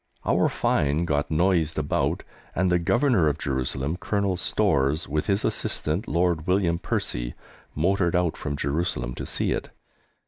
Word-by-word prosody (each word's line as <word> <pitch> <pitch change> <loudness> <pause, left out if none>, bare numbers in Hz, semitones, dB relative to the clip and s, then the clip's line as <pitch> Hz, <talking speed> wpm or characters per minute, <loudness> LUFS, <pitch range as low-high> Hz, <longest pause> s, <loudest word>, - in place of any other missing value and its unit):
Our - - +3
find 75 +4 +1
got 75 -2 0
noised 80 -1 +2
abroad, 75 -2 0 0.3
and 95 -1 +2
the 90 - +3
Governor 120 - +3
of 75 -1 +1
Jerusalem, 65 +2 -1
Colonel 100 -1 0
Storrs, 80 -6 +1
with 75 +2 -1
his 100 0 +1
assistant, 85 +9 -1
Lord 85 -2 +1
William 90 -3 +2
Percy, - - -3 0.4
motored 90 +2 +1
out 90 -2 +1
from 70 - -4
Jerusalem 70 -4 -1
to - - -6
see - - 0
it. - - -2
85 Hz, 145 wpm, -25 LUFS, 75-90 Hz, 0.4 s, Our